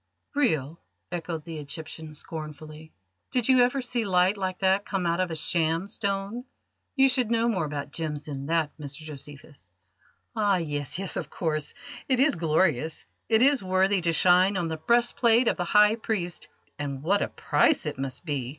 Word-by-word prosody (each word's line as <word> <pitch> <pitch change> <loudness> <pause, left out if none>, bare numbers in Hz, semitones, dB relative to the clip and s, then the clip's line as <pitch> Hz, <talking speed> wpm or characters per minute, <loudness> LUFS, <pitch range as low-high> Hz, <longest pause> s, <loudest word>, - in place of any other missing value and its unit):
"Real?" 165 - 0 0.3
echoed 165 -2 -4
the 165 -2 -6
Egyptian 155 +1 -8
scornfully. 155 0 -8 0.4
"Did 245 -3 0
you 260 -1 +6
ever 250 +2 +2
see 240 -1 -1
light 185 0 +3
like 185 -2 -3
that 190 +1 +3
come 195 -3 -2
out 170 +1 0
of 185 -1 0
a 165 - -4
sham 165 +2 +1
stone? 200 +2 -3 0.5
You 270 -1 +6
should 250 -3 +1
know 230 0 +2
more 190 -8 0
about 145 -1 -5
gems 150 -2 -4
than 140 -2 -6
that, 160 -2 0
Mr 145 +1 -7
Josephus." 145 - -11 0.7
"Ah 205 -3 +2
yes, 145 -4 -3
yes, 195 0 -3
of - - -4
course. 155 -3 -2 0.3
It 260 -2 +3
is 280 +3 +4
glorious; 160 -2 0 0.2
it 225 +1 +5
is 280 -2 +5
worthy 190 +1 +2
to 170 0 +1
shine 185 +4 +4
on 170 -2 -1
the 160 - -3
breastplate 235 +4 +3
of - - +2
the 175 - -2
High 210 +4 +5
Priest 195 -7 -3 0.3
and 140 -2 -4
what 200 +5 +2
a - - +1
price 310 - +1
it 150 -3 -4
must 135 +4 -4
be! 140 -6 -2
175 Hz, 180 wpm, -26 LUFS, 155-210 Hz, 0.7 s, you